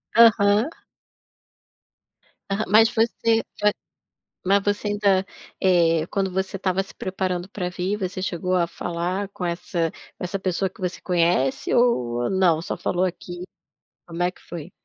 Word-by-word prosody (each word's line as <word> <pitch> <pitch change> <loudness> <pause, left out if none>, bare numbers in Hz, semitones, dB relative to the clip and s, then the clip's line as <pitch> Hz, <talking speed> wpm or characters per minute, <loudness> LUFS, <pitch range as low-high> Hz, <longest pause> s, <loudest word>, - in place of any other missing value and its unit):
Aham. 220 +1 +6 1.8
Aham, 200 +2 0
mas 220 +3 +6
você 225 0 +1 0.2
vai 210 0 +5 0.7
mas 195 +2 +3
você 205 +1 0
ainda, 200 -2 +2 0.4
eh, 165 -3 +3
quando 195 -1 -1
você 190 +1 -2
estava 190 0 0
se 195 - -14
preparando 185 -1 -2
pra 185 -3 -3
vir, 180 +3 -2
você 185 -1 -3
chegou 180 0 -1
a 170 -1 +2
falar 175 +3 -3
com 180 - -5
essa 170 -1 -1 0.3
com - - -6
essa 195 +2 -2
pessoa 190 0 -1
que 205 - -19
você 180 -1 -2
conhece 170 -7 +1
ou 120 - +2
não? 175 -4 +3
Só - - -3
falou 180 +1 0
aqui? 175 -1 -5 0.6
Como 170 0 -4
é 180 - +2
que - - -22
foi? 170 0 -8
185 Hz, 150 wpm, -24 LUFS, 175-200 Hz, 1.8 s, Aham